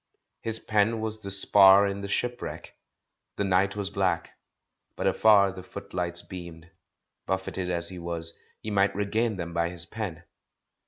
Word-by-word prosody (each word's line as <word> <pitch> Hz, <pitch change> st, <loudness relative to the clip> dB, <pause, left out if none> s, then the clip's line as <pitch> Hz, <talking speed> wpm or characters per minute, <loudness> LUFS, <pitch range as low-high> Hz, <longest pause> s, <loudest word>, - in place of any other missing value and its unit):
His 115 Hz, -1 st, 0 dB
pen 110 Hz, +1 st, +1 dB
was 110 Hz, 0 st, -3 dB
the 100 Hz, -, -4 dB
spar 100 Hz, 0 st, +7 dB
in 100 Hz, 0 st, -3 dB
the 100 Hz, -, -5 dB
shipwreck. 120 Hz, +4 st, -4 dB, 0.6 s
The -, -, -1 dB
night 95 Hz, +1 st, +1 dB
was 100 Hz, -1 st, -4 dB
black, 95 Hz, -4 st, -1 dB, 0.6 s
but -, -, -4 dB
afar 100 Hz, -3 st, +4 dB
the 95 Hz, -, -9 dB
footlights 90 Hz, -1 st, -5 dB
beamed. 85 Hz, -2 st, -10 dB, 0.6 s
Buffeted 95 Hz, -1 st, -3 dB
as 85 Hz, -1 st, -1 dB
he 90 Hz, -2 st, -8 dB
was, 85 Hz, -1 st, -5 dB, 0.3 s
he 110 Hz, -, -5 dB
might 100 Hz, -1 st, +2 dB
regain 110 Hz, +2 st, 0 dB
them 85 Hz, -2 st, -6 dB
by 85 Hz, 0 st, 0 dB
his 85 Hz, -2 st, -5 dB
pen. 95 Hz, -6 st, -6 dB
95 Hz, 155 wpm, -27 LUFS, 85-105 Hz, 0.6 s, spar